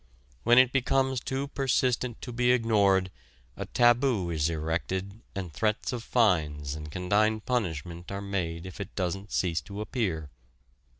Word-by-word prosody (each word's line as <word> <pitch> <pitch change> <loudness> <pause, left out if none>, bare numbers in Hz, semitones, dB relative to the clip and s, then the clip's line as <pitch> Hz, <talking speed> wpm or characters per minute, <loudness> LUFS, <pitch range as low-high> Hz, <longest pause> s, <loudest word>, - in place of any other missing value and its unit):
When 120 - +5
it 130 -1 +7
becomes 135 0 +1
too 135 +3 -3
persistent 125 -3 0
to 125 - -5
be 120 +1 +2
ignored 100 -6 +3 0.4
a - - -5
taboo 120 -6 +3
is 80 -1 +1
erected 90 +6 -3
and 90 -5 -5
threats 105 - 0
of 120 -2 -4
fines 75 - +1
and 75 0 -7
condign 105 +6 +2
punishment 85 - -3
are 100 - -3
made 90 -4 -3
if 95 +2 -7
it - - -8
doesn't 95 +1 -3
cease 85 -3 0
to 100 0 -8
appear. 95 - -2
100 Hz, 145 wpm, -28 LUFS, 85-120 Hz, 0.4 s, it